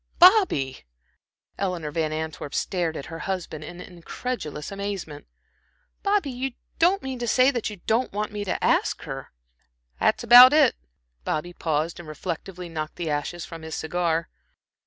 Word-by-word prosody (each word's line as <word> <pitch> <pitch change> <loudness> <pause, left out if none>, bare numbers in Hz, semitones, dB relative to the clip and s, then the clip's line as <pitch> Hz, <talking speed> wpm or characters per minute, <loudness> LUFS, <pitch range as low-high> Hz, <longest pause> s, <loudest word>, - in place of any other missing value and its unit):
"Bobby," 350 - +5 0.8
Eleanor 180 -6 -2
Van 155 0 -1
Antwerp 155 -2 -5
stared 170 -4 -1
at 140 - -6
her 165 0 -8
husband 180 -5 -4
in 175 +3 -9
incredulous 175 - -6
amazement. 195 -7 -5 0.7
"Bobby, 400 -8 +1
you 255 +1 -3 0.3
don't 365 +4 +3
mean 265 -2 -4
to 240 - -3
say 255 +4 +5
that 240 -5 -2
you 210 - -7
don't 230 +4 +1
want 210 +1 -3
me 210 -1 -4
to 190 - -3
ask - - +2
her?" - - -7 0.7
"That's - - +2
about 250 +3 +10
it." 300 -5 +5 0.5
Bobby 175 - -2
paused 160 0 -1
and 165 -3 -9
reflectively 180 +3 -5
knocked 155 -2 -5
the 165 -3 -3
ashes 150 +4 -3
from 165 -1 -9
his 160 -1 -6
cigar. 165 0 -1
175 Hz, 155 wpm, -25 LUFS, 160-240 Hz, 0.8 s, about